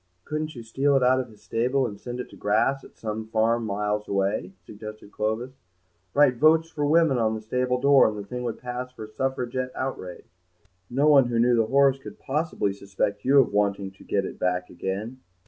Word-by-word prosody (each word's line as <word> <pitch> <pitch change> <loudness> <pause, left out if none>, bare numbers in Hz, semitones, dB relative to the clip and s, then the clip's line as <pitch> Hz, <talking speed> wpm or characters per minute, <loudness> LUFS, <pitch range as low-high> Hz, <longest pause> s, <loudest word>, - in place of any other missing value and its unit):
"Couldn't 155 0 -3
you 120 - -8
steal 135 +5 +1
it 130 - +1
out 130 +1 +4
of 125 -2 -4
his 110 - -18
stable 130 +4 0
and 100 -4 -6
send 120 +2 -6
it - - -4
to - - -15
grass 110 +7 +1
at - - -15
some 110 0 -4
farm 115 +1 +1
miles 105 +1 -2
away?" 100 -1 -1
suggested 105 0 -10
Clovis; 115 +5 -3 0.6
"write 140 -4 +5
'Votes 160 +3 +4
for 145 -2 -1
Women' 155 -4 +4
on 110 -1 +1
the - - -4
stable 125 +3 -1
door, 140 +1 +6
and 110 -1 -3
the 100 - -6
thing 125 +3 -5
would 120 -3 -3
pass 125 +1 -5
for 125 - -9
a 110 - -15
Suffragette 130 +1 -2
outrage. 95 -10 -6 0.6
No 140 +5 +2
one 140 -4 +6
who 120 -1 -1
knew 120 +1 +4
the 115 -2 +2
horse 135 +1 +4
could 135 - -10
possibly 145 -8 -1
suspect 100 +1 -3
you 140 +2 +4
of 130 -6 +4
wanting 100 -1 0
to 95 - -17
get 100 -1 0
it - - -7
back 90 0 -1
again." 100 +8 -4
120 Hz, 210 wpm, -25 LUFS, 105-135 Hz, 0.6 s, door